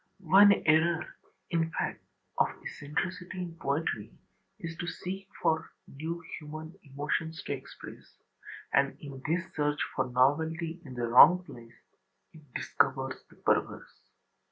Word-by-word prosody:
One 205 +1 +10
error, 160 +2 +3 0.4
in 165 -1 +1
fact, - - -3 0.4
of - - +5 0.2
eccentricity 180 +5 -4
in 170 -2 -7
poetry 140 -7 -1 0.5
is 165 0 -6
to 170 - -4
seek 190 +2 -5 0.2
for 160 0 +1 0.2
new 165 +4 -5 0.2
human 155 +2 -8
emotions 150 +3 -3
to - - -2
express: 135 -1 -10 0.6
and 140 0 +3
in 140 -3 -9
this 170 +3 +1
search 150 -1 0 0.2
for 130 -1 0
novelty 160 +6 +1
in 130 -5 -9
the 120 -1 -1
wrong 180 +10 +8
place 115 -9 -13 0.6
it 160 - -14
discovers 135 0 0
the - - -18
perverse. - - -1
160 Hz, 130 wpm, -30 LUFS, 140-170 Hz, 0.6 s, One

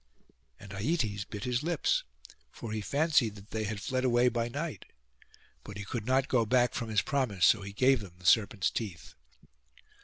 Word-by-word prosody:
And 100 - -12
Aietes 105 - -1
bit 105 0 -6
his 125 0 0
lips, 175 - +1 0.5
for 115 - -8
he 110 0 -2
fancied 140 -4 +2
that 100 +1 -14
they 110 -1 -2
had 105 0 -3
fled 130 +4 -2
away 125 -1 +4
by 120 0 -2
night: 145 - -5 0.8
but 105 -1 -9
he 105 - -6
could 110 +2 -5
not 130 +1 +2
go 120 -3 +2
back 125 +2 +2
from 115 -2 -3
his 110 -1 +2
promise; 130 -11 +1
so 110 - +5
he 100 0 -7
gave 130 +5 +3
them 95 -4 -10
the 90 - -17
serpents' 100 0 +3
teeth. 100 -8 -5
115 Hz, 185 wpm, -30 LUFS, 105-130 Hz, 0.8 s, so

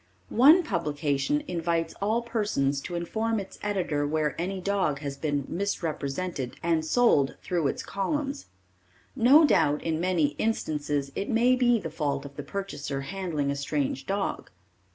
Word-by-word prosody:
One 300 +10 +7
publication 150 - -1
invites 170 - -1
all 220 +4 +1
persons 205 - 0
to 175 - -6
inform 220 +6 -1
its 195 -1 -9
editor 175 -8 -1
where 150 -1 0
any 190 +2 -2
dog 190 -6 0
has 140 -2 -4
been 145 -1 -2
misrepresented 165 -6 -3
and 165 -2 +2
sold 155 - +3
through 170 -5 0
its - - -3
columns. 275 +8 -3 0.7
No 270 +6 +7
doubt 150 - +2
in 160 0 -1
many 175 -5 +2
instances 150 -9 -1
it 200 - -3
may 245 +2 +4
be 245 -2 +3
the 160 -6 -6
fault 145 -3 -2
of 140 0 -10
the 145 - -5
purchaser 145 -5 -4
handling 155 -3 -2
a - - -2
strange 140 -1 -2
dog. 195 0 -2
170 Hz, 150 wpm, -27 LUFS, 145-205 Hz, 0.7 s, One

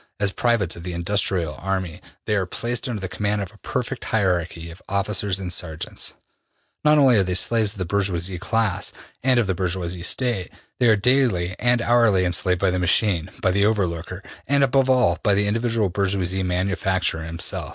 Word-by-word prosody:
As 100 -2 +1
privates 115 -6 0
of 85 - -9
the 90 +1 -5
industrial 90 -2 -1
army 95 -3 -3 0.2
they 105 - 0
are 95 -2 0
placed 120 +6 -3
under 115 -4 -3
the 95 - -4
command 105 +2 -2
of 100 -2 -5
a 110 - -20
perfect 125 0 -4
hierarchy 90 -6 -1
of 85 - -14
officers 100 0 0
and 90 -2 -4
sergeants. 80 -1 -4 0.7
Not 150 0 +5
only 135 -5 +6
are 100 - +4
they 90 -1 -1
slaves 110 +2 +2
of - - -15
the 90 - -2
bourgeois 100 -1 0 0.2
class, 110 0 0 0.3
and 130 -1 +3
of 115 - +2
the 95 - 0
bourgeois 90 -1 -2
State, 100 0 0 0.3
they 125 - +4
are 110 - +6
daily 105 -6 +2
and 120 -1 +2
hourly 115 -6 +4
enslaved 90 0 0
by 95 -2 +3
the 90 - -1
machine, 90 -1 +1
by 95 - +3
the 100 +2 +2
over 105 -3 +2
looker, 85 +3 -6 0.2
and, 140 0 +3
above 135 0 +2
all, 125 -10 +3
by 100 - +3
the 100 +1 +2
individual 115 0 0
bourgeois 95 0 0
manufacturer 95 -2 -1
himself. 85 +1 -3
100 Hz, 190 wpm, -22 LUFS, 90-115 Hz, 0.7 s, only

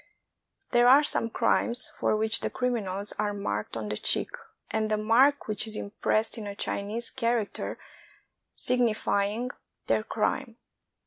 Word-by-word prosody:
There 240 0 +5
are 275 +4 +7
some 230 -5 0
crimes 240 +2 +2
for - - +1
which 220 +1 +3
the - - -2
criminals 210 -6 -2
are 205 -1 0
marked 105 - -3
on 105 -2 -4
the 105 - -2
cheek, - - 0 0.4
and 220 -1 0
the 215 - +1
mark 250 +7 +3
which 215 +1 -2
is 220 - -1
impressed 215 +2 -1
is - - -6
a 200 0 -6
Chinese 210 +3 -3
character 235 -4 -2 0.8
signifying 230 -1 +1 0.3
their 110 -1 +2
crime. - - -2
220 Hz, 140 wpm, -28 LUFS, 205-240 Hz, 0.8 s, are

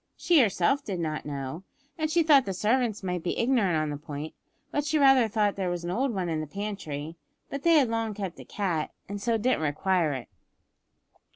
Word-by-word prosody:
She 345 -3 +4
herself 240 +4 +2
did 190 -7 -4
not 155 -2 -3
know, 140 +4 -5 0.3
and 310 -1 -1
she 335 +1 +3
thought 290 -4 +6
the 195 -2 -3
servants 220 +1 +1
might 180 -2 -2
be 175 - -2
ignorant 230 -9 +2
on 155 -1 -1
the 145 - -4
point, 150 +1 -7 0.4
but 290 - 0
she 305 +2 +1
rather 270 -4 +6
thought 210 -1 +1
there 190 -2 -1
was 175 -1 -3
an 175 - -3
old 255 +7 0
one 190 -5 -2
in 160 -2 -1
the 155 - -5
pantry, 165 -5 -5 0.3
but 280 - -4
they 335 +2 +4
had 285 -5 +5
long 225 -2 -2
kept 195 -4 -5
a - - -8
cat, 175 -7 -2 0.2
and 200 0 -5
so 230 +1 +1
didn't 245 -3 +1
require 160 +1 +1
it. 130 -3 -6
200 Hz, 210 wpm, -27 LUFS, 160-250 Hz, 0.4 s, thought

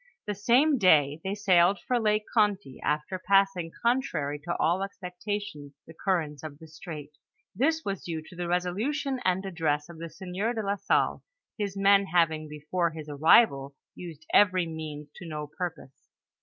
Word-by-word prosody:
The 210 - -2
same 250 +8 +3
day 155 -5 +4
they 195 +1 -2
sailed 190 -2 +4
for 245 +5 -1
Lake 215 -1 +1
Gonty, 205 - +1
after 150 +5 -2
passing 195 -3 +2
contrary 235 - 0
to 170 +4 -4
all 170 +4 +1
expectations 195 -5 -5
the 165 - -13
currents 160 -5 -1
of 155 -2 -8
the 160 - -13
strait. 155 -2 -9 0.4
This 320 - 0
was 195 -2 -3
due 160 -2 -4
to 175 - -14
the 175 0 -4
resolution 235 +11 -1
and 185 0 0
address 155 -5 -1
of 170 -2 -11
the 165 0 -6
sieur 190 +7 -3
de 220 -2 -3
la 200 +1 0
Salle, - - +1 0.3
his 200 -2 -4
men 195 0 +4
having 165 -4 +1
before 150 +4 -2
his 155 -1 -9
arrival 140 -2 +4 0.2
used 160 -3 -10
every 185 -3 +5
means 155 -2 -7
to 175 - -9
no 150 -2 -5
purpose. 155 -3 -7
180 Hz, 165 wpm, -28 LUFS, 155-200 Hz, 0.4 s, every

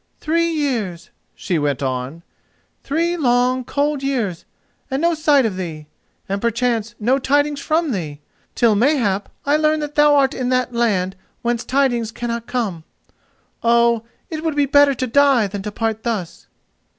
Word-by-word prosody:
"Three 335 +2 +1
years," 235 - -2 0.2
she 175 -4 -2
went 145 -2 -1
on—"three 170 - -4
long, 250 -2 +2
cold 285 +2 -1
years, 235 -11 -2 0.4
and 265 0 -1
no 340 +2 +2
sight 300 -4 +3
of 200 -4 -2
thee, 160 -5 -6 0.4
and 195 +1 -2
perchance 235 -1 -1
no 250 +5 +2
tidings 290 +2 +1
from 315 +1 0
thee, 155 -9 -4 0.4
till 235 -3 +4
mayhap 210 -4 +1 0.2
I 290 +2 +3
learn 310 0 +2
that 295 0 -5
thou 295 0 +5
art 275 0 +3
in 250 -1 -2
that 255 -1 0
land 195 -6 0 0.3
whence 240 0 0
tidings 245 -4 0
cannot 235 0 -4
come. 205 -10 -2 0.8
Oh, 235 0 +3 0.3
it 315 -1 -4
would 320 -3 -1
be 290 -1 +3
better 285 0 +4
to 255 - -2
die 270 -2 +4
than 200 0 -5
to 210 +1 -5
part 220 0 -2
thus." 210 -8 -4
245 Hz, 155 wpm, -20 LUFS, 205-285 Hz, 0.8 s, thou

